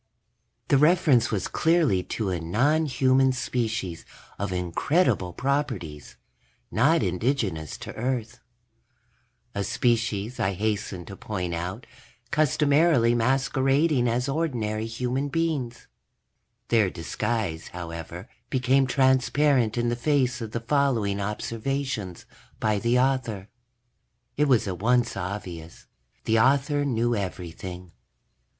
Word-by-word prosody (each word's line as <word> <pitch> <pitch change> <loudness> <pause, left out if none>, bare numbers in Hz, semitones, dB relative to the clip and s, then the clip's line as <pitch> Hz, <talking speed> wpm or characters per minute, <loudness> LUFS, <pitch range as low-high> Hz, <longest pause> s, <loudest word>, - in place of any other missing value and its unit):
The 140 - +5
reference 150 -6 +4
was 100 -5 -1
clearly 160 - +2
to 105 -4 -3
a 90 - -1
nonhuman 130 - +2
species 115 -9 -2 0.4
of 100 -1 -2
incredible 90 - +1
properties, 120 - -3 0.5
not 145 +5 +3
indigenous 95 - -1
to - - -8
Earth. 120 -1 -3 1.1
A 100 - -2
species, 115 0 0
I 95 +1 +1
hasten 100 -3 -2
to 100 - -9
point 90 -4 -4
out, 90 +7 -4 0.5
customarily 150 -4 +3
masquerading 135 +3 +2
as 120 +3 0
ordinary 120 -8 -1
human 125 +4 -2
beings. 145 -6 -2 0.8
Their 110 -5 +3
disguise, 90 0 -3
however, 85 +2 -7 0.2
became 130 +1 +2
transparent 130 -2 +2
in 120 0 +1
the 120 - 0
face 130 -1 +1
of 115 - -4
the 115 +1 -4
following 115 -7 +1
observations 110 -1 -3 0.3
by 105 -2 +1
the 120 +3 +2
author. 125 -7 0 0.9
It 150 +1 +2
was 125 -6 +3
at 90 -2 -4
once 120 +2 +2
obvious 90 -4 -6 0.4
the 110 0 +2
author 140 +4 +2
knew 120 -2 +1
everything. 90 -2 -6
120 Hz, 110 wpm, -26 LUFS, 100-135 Hz, 1.1 s, The